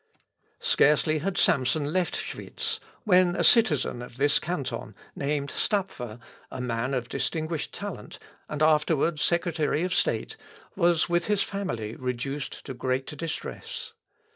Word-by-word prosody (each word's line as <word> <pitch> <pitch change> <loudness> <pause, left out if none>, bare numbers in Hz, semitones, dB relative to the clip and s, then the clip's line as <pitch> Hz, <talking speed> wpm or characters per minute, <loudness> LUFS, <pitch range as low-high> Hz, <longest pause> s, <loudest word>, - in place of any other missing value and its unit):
Scarcely 150 +2 +4
had 185 +5 -2
Samson 145 +3 +2
left 185 -2 +1
Schwitz 455 -1 -4 0.2
when 180 -4 +5
a 170 - +1
citizen 155 - +4
of 125 0 -10
this 145 +2 +4
canton, 165 -5 -4 0.2
named 140 0 -1
Stapfer, 135 - -2 0.3
a 130 - -7
man 125 +2 -1
of 120 -2 -2
distinguished 155 +3 -2
talent, - - -7 0.3
and 150 0 -1
afterward 155 0 +3
secretary 170 -2 +1
of 185 0 0
state, - - 0 0.4
was 170 -3 +3
with 175 0 +1
his 205 -1 +3
family 120 - -3
reduced 130 +3 -4
to 135 - -5
great 130 +3 -2
distress. 165 +1 -5
150 Hz, 130 wpm, -27 LUFS, 130-175 Hz, 0.4 s, when